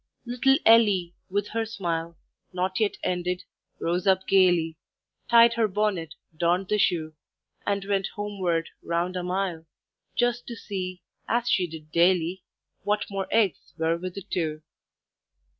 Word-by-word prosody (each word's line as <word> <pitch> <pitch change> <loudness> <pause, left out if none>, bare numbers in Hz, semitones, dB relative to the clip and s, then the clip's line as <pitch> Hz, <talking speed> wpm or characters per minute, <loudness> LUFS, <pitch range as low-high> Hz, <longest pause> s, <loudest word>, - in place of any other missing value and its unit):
Little 255 +3 +3
Ellie, 205 -6 +5 0.2
with 205 +2 -1
her 225 0 -1
smile 170 -6 -3 0.3
Not 185 +1 -1
yet 215 -2 +1
ended, 180 0 -1 0.4
rose 175 +3 -1
up 190 0 +3
gaily, 175 -4 +4 0.5
Tied 235 0 +7
the 230 -2 +3
bonnet, 190 -6 -1 0.2
donned 175 +3 +1
the 210 - +2
shoe, 160 -5 +1 0.5
And 200 -1 0
went 195 -1 0
homeward, 190 -5 -1
round 170 +2 -1
a 180 - -1
mile, 180 -2 -2 0.5
Just 245 0 +1
to 235 - -5
see, 185 -5 -5 0.2
as 240 +1 0
she 185 -6 +2
did 155 -2 -11
daily, 175 +1 +3 0.4
What 210 0 0
more 195 -1 -2
eggs 205 -8 +1
were 165 0 +1
with 180 +1 -6
the 200 - -6
two. 155 -5 -2
185 Hz, 140 wpm, -26 LUFS, 170-205 Hz, 0.5 s, Tied